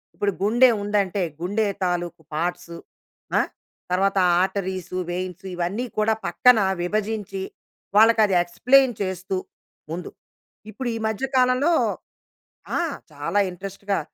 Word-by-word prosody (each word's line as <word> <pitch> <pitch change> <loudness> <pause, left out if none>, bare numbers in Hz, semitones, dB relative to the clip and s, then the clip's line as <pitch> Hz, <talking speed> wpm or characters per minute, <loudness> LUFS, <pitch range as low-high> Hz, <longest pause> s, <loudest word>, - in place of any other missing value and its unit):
ఇప్పుడు 205 0 0
గుండెవుందంటే, 205 -4 +3 0.2
గుండె 205 +5 0 0.2
తాలూకు 175 -2 -2
పార్ట్స్ 170 +1 -3 0.6
ఆ! - - +5 0.5
తర్వాత 195 +2 +2 0.2
ఆర్టరీస్, 185 -2 -2 0.2
వేయిన్స్ 185 +1 -4
ఇవన్నీ 180 +8 -2
కూడా, 215 +1 +3
పక్కన 245 +7 +5 0.2
విభజించి, 205 0 -2 0.5
వాళ్ళకి 225 +1 +6
అది 195 -3 +1
ఎక్స్‌ప్లెయిన్ 250 +9 +4
చేస్తూ 185 0 -2 0.5
ముందు. 175 +2 -5 0.6
ఇప్పుడు 240 +4 -4
ఈ - - -2
మధ్య 220 +4 -1
కాలంలో 255 +6 +3 1.1
ఆ! - - +1 0.3
చాలా 150 +7 -2
ఇంట్రెస్ట్‌గా 195 +1 -3
195 Hz, 105 wpm, -23 LUFS, 180-220 Hz, 1.1 s, వాళ్ళకి